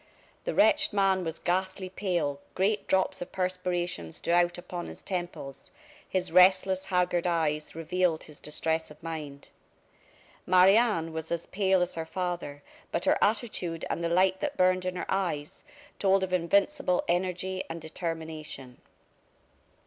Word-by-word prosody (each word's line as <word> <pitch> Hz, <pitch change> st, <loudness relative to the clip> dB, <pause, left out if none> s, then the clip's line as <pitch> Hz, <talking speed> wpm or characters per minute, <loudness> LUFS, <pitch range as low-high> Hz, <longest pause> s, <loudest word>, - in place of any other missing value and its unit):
The -, -, -2 dB
wretched 310 Hz, -3 st, +4 dB
man 195 Hz, -2 st, +3 dB
was 165 Hz, -1 st, -4 dB
ghastly 185 Hz, +1 st, -1 dB
pale, 180 Hz, -7 st, -1 dB, 0.2 s
great 205 Hz, +2 st, +1 dB
drops 190 Hz, 0 st, +1 dB
of 175 Hz, -, -6 dB
perspiration 180 Hz, -, -2 dB
stood 170 Hz, -, -2 dB
out 175 Hz, 0 st, +3 dB
upon 175 Hz, 0 st, -6 dB
his -, -, -10 dB
temples, 175 Hz, -7 st, -5 dB, 0.4 s
his 185 Hz, -2 st, -1 dB
restless, 185 Hz, +1 st, +5 dB
haggard 180 Hz, -2 st, +1 dB
eyes 155 Hz, -3 st, 0 dB
revealed 165 Hz, 0 st, 0 dB
his 150 Hz, -, -11 dB
distress 160 Hz, +1 st, -1 dB
of 150 Hz, +1 st, -15 dB
mind. 150 Hz, -4 st, -6 dB, 1.0 s
Marie 185 Hz, +2 st, +7 dB
Anne 210 Hz, -9 st, +2 dB
was 160 Hz, 0 st, -5 dB
as 170 Hz, 0 st, -2 dB
pale 190 Hz, -2 st, +2 dB
as 180 Hz, -, -4 dB
her 165 Hz, -1 st, -3 dB
father, 170 Hz, -5 st, -4 dB, 0.3 s
but 170 Hz, -, -1 dB
her -, -, +3 dB
attitude 205 Hz, -7 st, -1 dB
and 170 Hz, -, -2 dB
the 170 Hz, -, +1 dB
light 185 Hz, +2 st, +3 dB
that 295 Hz, -1 st, -3 dB
burned 185 Hz, 0 st, +3 dB
in 180 Hz, -, -2 dB
her 180 Hz, -, -3 dB
eyes 170 Hz, -7 st, -2 dB, 0.4 s
told 195 Hz, -1 st, +3 dB
of 185 Hz, -1 st, -3 dB
invincible 180 Hz, -, +2 dB
energy 185 Hz, +1 st, -1 dB
and 165 Hz, +1 st, -5 dB
determination. 160 Hz, -5 st, -6 dB
180 Hz, 150 wpm, -29 LUFS, 165-190 Hz, 1.0 s, Marie